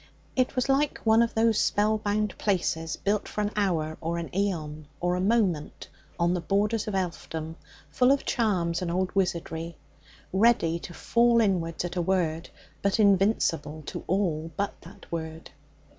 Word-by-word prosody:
It 255 +1 +1
was 255 0 +1
like 275 +2 +2
one 225 0 +5
of 235 -1 0
those 225 -1 +3
spell 215 +1 +2
bound 210 -1 -1
places 165 -5 0
built 205 +1 -1
for 210 - -3
an 210 0 -1
hour 165 -7 0
or 165 +1 -2
an 165 -4 -6
aeon 155 -7 -2
or 175 0 0
a 180 - 0
moment 190 -7 0 0.3
on 170 +1 +2
the 180 - -1
borders 205 +5 0
of 210 - -2
elfdom, 165 -3 -3 0.4
full 250 +1 +4
of 280 - +1
charms 185 -8 0
and 180 - -2
old 185 +2 -1
wizardry, 170 -3 -2 0.6
ready 190 -5 +3
to 175 - -9
fall 235 0 +3
inwards 180 -6 0
at 175 +1 -5
a - - +2
word, 170 -2 0 0.3
but 200 +3 +1
invincible 195 -7 +2
to - - -6
all 165 -4 0
but 200 0 -1
that - - -14
word. 160 -1 -5
185 Hz, 165 wpm, -27 LUFS, 165-210 Hz, 0.6 s, one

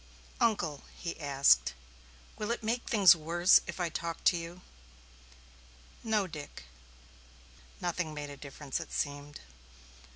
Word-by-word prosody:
"Uncle," 170 -11 +1 0.2
he 170 -2 -5
asked, 140 - +3 0.6
"will 210 - -4
it 235 -1 -2
make 235 +3 -1
things 195 -5 +7
worse 170 +3 +4
if - - -6
I 175 -1 0
talk 165 +1 -5
to - - +5
you?" 170 +1 -6 1.4
"No, 215 -3 +1
Dick." 150 - -9 1.2
Nothing 175 -2 -2
made 145 -1 -6
a - - -8
difference, 140 -1 -6
it - - -8
seemed. 145 0 -4
170 Hz, 125 wpm, -31 LUFS, 145-185 Hz, 1.4 s, things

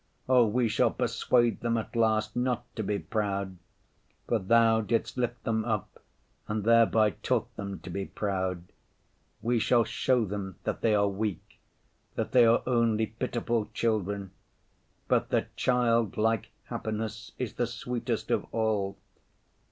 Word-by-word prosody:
Oh, 125 -3 +5
we 120 +3 +1
shall 110 - +3
persuade 120 -2 +1
them 115 -1 0
at 115 - -5
last 110 -1 +2
not 125 0 0
to 110 - -2
be 105 0 -1
proud, 100 -4 -2 0.7
for 115 - +1
Thou 115 +2 +4
didst 115 +1 -1
lift 120 -1 -2
them 110 -1 0
up 110 -4 -3 0.5
and 105 -1 -2
thereby 115 -1 +4
taught - - -2
them 100 -1 -5
to 95 - -8
be 100 +2 -3
proud. 95 -3 -2 0.8
We 120 +1 +2
shall 120 +1 +4
show 125 0 +1
them 95 -2 -5
that - - -3
they 110 -2 +3
are 100 0 +3
weak, 100 -1 -4 0.6
that - - -2
they 120 -2 +6
are 115 - +4
only 115 -3 +2
pitiful 115 -1 -2
children, 100 -4 -1 0.8
but - - +2
that - - -1
childlike 115 -3 +1
happiness 110 -1 -5
is 125 -4 -3
the 120 - -1
sweetest 125 +1 -3
of - - 0
all. 105 -3 0
110 Hz, 145 wpm, -29 LUFS, 105-115 Hz, 0.8 s, they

